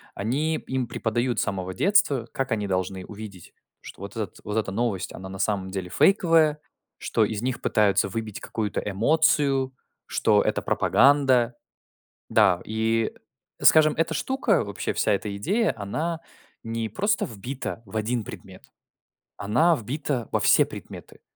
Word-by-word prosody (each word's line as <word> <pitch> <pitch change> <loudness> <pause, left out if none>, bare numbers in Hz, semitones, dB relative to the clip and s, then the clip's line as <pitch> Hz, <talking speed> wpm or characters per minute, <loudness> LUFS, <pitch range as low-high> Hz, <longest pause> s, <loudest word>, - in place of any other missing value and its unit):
они 140 +10 -1
им 130 -1 -3
преподают 120 +2 -1
с - - +2
самого 95 -3 -3
детства, 185 - +2
как 135 -1 -2
они 105 -2 -1
должны 95 0 -2
увидеть, 105 -4 -10 0.3
что - - -12
вот 100 - -7
этот 105 -5 -5
вот 105 +1 -3
эта 110 -3 -1
новость 105 -2 -2
она 95 - -8
на 95 0 -8
самом 95 -2 -1
деле 95 -2 -4
фейковая, 165 - +3 0.4
что 110 - +1
из 105 0 -3
них 125 +1 -2
пытаются 100 -2 +2
выбить 110 0 -5
какую-то 105 -3 -3
эмоцию, 135 +4 +2 0.3
что - - +2
это - - 0
пропаганда. 130 -4 +3 0.8
Да, 95 -5 +4
и 110 +1 0 0.5
скажем, 155 -1 +6
эта 165 0 +1
штука, 250 - +1
вообще 100 -1 -3
вся 105 - +1
эта 100 0 -2
идея, 205 - +1
она 155 +11 -3 0.4
не 115 0 -3
просто 205 - 0
вбита 115 +2 -6
в 95 - -8
один 115 +2 -1
предмет, - - -11 0.7
она 120 +12 +3
вбита 130 +1 -3
во - - +1
все - - +5
предметы. - - -11
115 Hz, 145 wpm, -25 LUFS, 100-145 Hz, 0.8 s, скажем